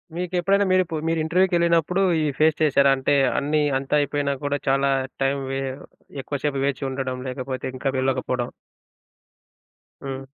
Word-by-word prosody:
మీకెప్పుడైనా 180 +3 +1
మీరిప్పుడు 175 -4 +1
మీరు 165 - 0
ఇంటర్‌వ్యూ‌కి 180 +3 +2
వెళ్ళినప్పుడు 170 +2 +2 0.2
ఇవి 150 -2 0
ఫేస్ 155 0 +4
చేశారా? 140 -2 +4
అంటే 140 +2 +1 0.2
అన్నీ 150 +2 +1 0.2
అంతా 135 +1 -5
అయిపోయినా 145 0 -1
కూడా 145 0 0
చాలా 135 +1 +2 0.3
టైం 135 +1 +1
వే 135 - -2 0.6
ఎక్కువ 140 +1 -4
సేపు 140 -2 0
వేచి 140 0 -2
ఉండడం, 130 -1 -3
లేకపోతే 130 0 -5
ఇంకా 135 +1 -1
వెళ్ళకపోవడం. 130 -2 -1 1.5
హ్మ్. 135 0 -5
145 Hz, 140 wpm, -23 LUFS, 135-165 Hz, 1.5 s, ఫేస్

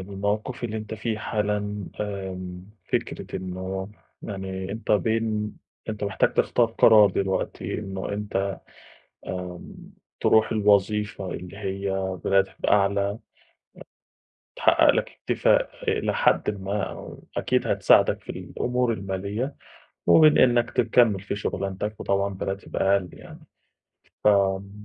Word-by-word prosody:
الموقِف 105 +5 -2
اللي 110 -1 -3
أنت 110 0 -5
في 110 0 -3
حالًا 105 -2 -2
آمم، 95 -3 -5 0.3
فكرة - - -2
إنه 95 +1 -5 0.3
يعني 95 -1 -5
أنت 110 0 -2
بين، 110 0 0 0.3
أنت 105 -1 -3
محتاج 100 -1 +1
تختار 120 - +3
قرار 110 -2 +6
دلوقتي 95 -1 -2
إنه 95 -2 -5
أنت 100 -1 -2 0.7
آمم 90 -1 -6 0.4
ترُوح 110 0 +4
الوظيفة 105 -2 +1
اللي 90 +2 -7
هي 100 -1 -3 0.3
براتب 95 0 +1
أعلى 100 0 +2
أ 105 - -9 1.4
تحقّق - - +4
لك - - 0
اكتفاء - - +1 0.2
آآ - - +1
لحدٍ - - +2
ما 100 +1 -1
أو - - -8
أكيد - - +1
هتساعدك - - +4
في - - -22
الأمور 125 -1 -1
المالية 100 +7 -3 0.5
وبين 155 -2 +7
إنك 120 -1 +4
تكمّل 115 -3 +3
في 100 +1 -4
شُغلانتك 100 +1 -3
وطبعًا 100 0 0
براتب 95 +1 -5
أقَل 95 -2 +2
يعني، - - -12 0.9
فم 100 -1 +3
100 Hz, 115 wpm, -25 LUFS, 95-110 Hz, 1.4 s, وبين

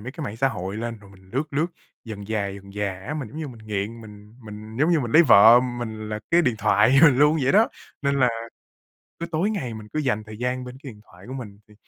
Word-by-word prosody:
mấy 125 +5 -7
cái 155 -2 -6
mạng 110 -2 -6
xã 135 +3 +2
hội 95 -3 -5
lên 115 0 -5
rồi 100 -1 -17
mình 95 -1 -19
lướt 140 +6 -3
lướt 150 +4 +1 0.4
dần 105 -4 -8
dà, 105 -2 -1
dần 100 0 -9
dà 105 -1 -2
á, 150 - -3
mình 145 -7 -5
giống 150 - -9
như 155 -3 -4
mình 110 -3 -13
nghiện, 105 +2 -3
mình 105 0 -14
mình 105 +1 -10
giống 155 +5 +3
như 165 -3 +3
mình 120 -3 -4
lấy 170 - +8
vợ 115 -3 +8
mình 120 -4 -5
là 105 - -3
cái 170 +1 +5
điện 125 -6 +1
thoại 115 +7 +4
luôn 150 +1 +5
vậy 130 - +2
đó. 215 +3 +5 0.3
Nên 140 0 +1
là 125 - +5 0.9
cứ 170 - -3
tối 175 +6 0
ngày 130 - -3
mình 110 -1 -9
cứ 155 - 0
dành 120 -7 -1
thời 105 -1 -11
gian 125 +1 -2
bên 125 0 -9
cái 135 - -7
điện 105 -2 -16
thoại 90 +2 -16
của 130 - -7
mình 105 -6 -8
thì 105 - -19
115 Hz, 265 wpm, -24 LUFS, 105-140 Hz, 0.9 s, lấy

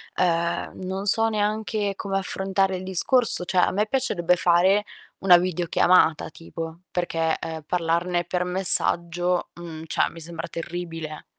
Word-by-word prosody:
ehm, 170 -1 0
non 190 +2 -4
so 225 +2 +5
neanche 210 -1 -1
come 195 -1 -2
affrontare 190 0 -1
il 180 - -8
discorso, 190 +3 +2
cioè 185 - -3
a - - +3
me 210 +3 0
piacerebbe 180 -9 0
fare 185 +5 +3 0.3
una 185 -2 +6
videochiamata 175 -2 +2
tipo, 165 +1 -8
perché, 165 -2 -1
uhm, 160 -1 -6
parlarne 175 +1 0
per 180 0 -2
messaggio, 175 -1 +1
mhmm, 160 -2 -8
cioè - - +1
mi 165 - -11
sembra 165 +1 -5
terribile. 165 -2 -6
180 Hz, 135 wpm, -24 LUFS, 170-195 Hz, 0.3 s, una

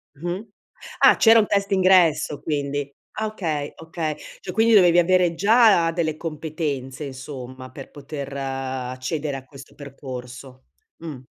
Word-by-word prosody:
Mh-mh. 175 +8 -5 0.5
Ah, - - +7
c'era 225 0 +6
un 210 - +2
test 200 -1 +1
d'ingresso 185 -6 +3
quindi. 145 -2 -3 0.2
Ah 220 0 -1
okay, 160 -9 -3
okay. 160 -1 -4 0.3
Cioè - - -6
quindi 225 +1 +3
dovevi 175 -4 +6
avere 175 -1 +3
già 200 -3 +5
delle 160 -2 -2
competenze 155 -4 -4
insomma 130 -1 -8
per 135 0 -11
poter 140 -1 -7
accedere 135 +2 -4
a 130 - -11
questo 135 -1 -14
percorso. 130 -2 -9 0.3
Mh. 160 -5 -7
150 Hz, 135 wpm, -23 LUFS, 135-175 Hz, 0.5 s, Ah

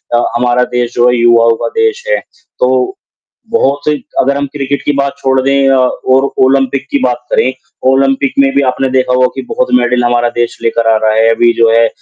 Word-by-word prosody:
अ, 120 - +1
हमारा 125 0 +1
देश 120 0 -1
जो 120 0 +3
है 125 - +1
युवाओं 115 -1 +4
का - - 0
देश 450 +1 0
है, - - +1 0.4
तो 385 -6 0 0.6
बहुत 145 -10 0
ही 150 - +3 0.3
अगर 140 +2 +1
हम 140 - -2
क्रिकेट 140 -1 -3
की - - -1
बात 140 0 -1
छोड़ 130 0 0
दें 135 +1 +1
अ, 135 - +3
और 130 +1 +1 0.2
ओलंपिक 135 0 0
की 140 - +1
बात 125 -1 -2
करें, 130 +1 +1 0.4
ओलंपिक 135 0 +1
में 135 -1 +3
भी 140 - +3
आपने 135 +1 -2
देखा 130 -1 0
होगा 125 0 +3
कि 135 - -4
बहुत - - -1
मेडल 125 0 0
हमारा 120 0 +1
देश 120 0 -2
लेकर 115 0 0
आ 110 - +3
रहा 110 0 0
है। 110 +1 +3
अभी 120 +1 +3
जो 115 -1 +2
है 115 0 +3
130 Hz, 215 wpm, -11 LUFS, 120-140 Hz, 0.6 s, युवाओं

